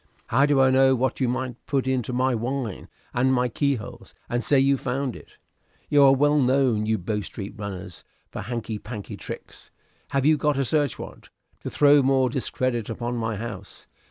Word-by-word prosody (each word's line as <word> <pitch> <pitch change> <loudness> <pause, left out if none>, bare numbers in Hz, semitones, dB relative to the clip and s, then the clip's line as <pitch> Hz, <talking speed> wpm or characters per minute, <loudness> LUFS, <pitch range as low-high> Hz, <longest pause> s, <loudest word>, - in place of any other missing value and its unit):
"How 140 +2 +4
do 145 -2 +3
I 130 0 +5
know 130 0 +5
what 130 0 -1
you 130 - +1
might 125 -1 -4
put 135 -2 0
into 130 -2 -1
my 130 +1 +1
wine 120 -2 -3 0.3
and 130 +2 +2
my 125 -1 +2
keyholes, 135 -2 -3
and 120 0 -1
say 140 - +3
you 135 +1 +4
found 130 -1 -3
it? - - -15 0.5
You 145 - +5
are 135 -1 +7
well 145 +2 +3
known, 125 -5 +2
you 110 0 +2
Bow 105 +3 -2
Street 100 0 -7
runners, 95 -4 -7 0.3
for - - -6
your - - -6
hanky 115 -2 -4
panky 105 -2 -7
tricks. - - -9 0.4
Have 140 -1 0
you 155 0 +5
got 150 0 +1
a 135 - +1
search 145 +2 +1
warrant, - - -10 0.3
to - - -6
throw 145 0 +5
more 130 -1 +2
discredit 125 -3 -2
upon 120 +1 -3
my 115 -1 -2
house? 105 -2 -8
130 Hz, 190 wpm, -24 LUFS, 115-135 Hz, 0.5 s, are